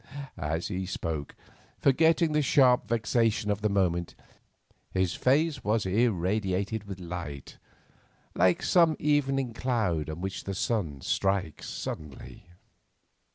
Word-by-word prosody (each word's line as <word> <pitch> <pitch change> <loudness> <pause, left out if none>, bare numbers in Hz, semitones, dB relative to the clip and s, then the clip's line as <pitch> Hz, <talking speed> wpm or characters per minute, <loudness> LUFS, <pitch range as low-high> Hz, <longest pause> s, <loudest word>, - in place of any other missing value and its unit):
As 80 +2 -3
he 95 -2 -3
spoke, 80 -5 -4 0.4
forgetting 160 +4 +3
the 150 0 +2
sharp 130 -3 +4
vexation 115 -1 +1
of 105 0 -2
the 105 - +1
moment, 90 -4 0 0.7
his 95 -2 0
face 145 +2 +1
was 105 0 +1
irradiated 100 0 0
with 95 -2 -7
light—like 85 +1 -4
some 170 -3 +4
evening 135 -4 +1
cloud 110 - -1
on 80 +2 -5
which 95 +1 -5
the 100 - -3
sun 90 - -1
strikes 95 -3 -1
suddenly. 75 +1 -7
100 Hz, 110 wpm, -28 LUFS, 90-125 Hz, 0.7 s, sharp